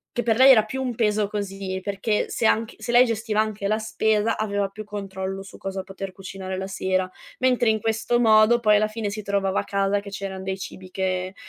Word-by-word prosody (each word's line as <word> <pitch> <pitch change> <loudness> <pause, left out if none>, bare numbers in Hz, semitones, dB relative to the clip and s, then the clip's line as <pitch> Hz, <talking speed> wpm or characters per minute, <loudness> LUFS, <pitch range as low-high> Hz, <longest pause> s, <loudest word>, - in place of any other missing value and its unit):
che 240 - 0
per 225 -1 +2
lei 265 +1 +8
era 220 -4 +6
più 265 +5 -5
un 250 -3 -2
peso 210 -2 +1
così, 195 -2 -4
perché 205 +2 -1
se 230 - -1
anche 225 0 +1
se 240 - -3
lei 245 +1 +8
gestiva 220 -2 0
anche 210 -2 -3
la 215 +1 +1
spesa 220 0 +1
aveva 205 -2 -1
più 215 +1 -9
controllo 195 -2 -5
su 195 - -13
cosa 195 0 -5
poter 195 0 -7
cucinare 190 0 -6
la 190 0 -4
sera, 185 -1 -1 0.3
mentre 250 -2 +2
in 220 -1 +1
questo 225 +1 0
modo 225 0 +5
poi 210 -2 +5
alla 215 +1 +2
fine 215 -1 -4
si 210 +1 -6
trovava 200 -1 0
a - - -2
casa 200 0 +1
che 200 0 -10
c'eran 195 -1 -5
dei 190 0 -3
cibi 185 0 -9
che 185 0 -2
205 Hz, 220 wpm, -24 LUFS, 195-220 Hz, 0.3 s, lei